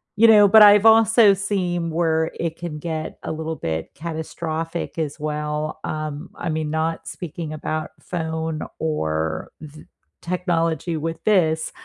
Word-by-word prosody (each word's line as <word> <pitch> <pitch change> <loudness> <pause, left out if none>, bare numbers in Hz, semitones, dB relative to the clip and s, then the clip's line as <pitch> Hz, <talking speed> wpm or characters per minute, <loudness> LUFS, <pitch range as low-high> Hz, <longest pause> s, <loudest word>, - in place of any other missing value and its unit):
you 225 +3 +6
know, 210 -2 +8
but 215 +2 +7
I've 205 +1 +8
also 225 -1 +6
seen 180 -4 -1
where 160 -1 +1
it 165 -1 -3
can 170 -3 -6
get 160 0 -5
a - - -3
little 160 0 -4
bit 80 -1 -4
catastrophic 165 +1 -5
as 155 -2 -3
well, 150 0 -3
um, 155 +2 -5
I 175 - -5
mean, 155 -1 -2
not 160 +1 -2
speaking 165 -3 -6
about 155 0 -4
phone 160 -2 -4 0.2
or 80 - -2
th 155 0 -12 0.4
technology 170 -2 -1
with 165 +1 -4
this, 160 -7 +2
160 Hz, 140 wpm, -22 LUFS, 155-175 Hz, 0.4 s, know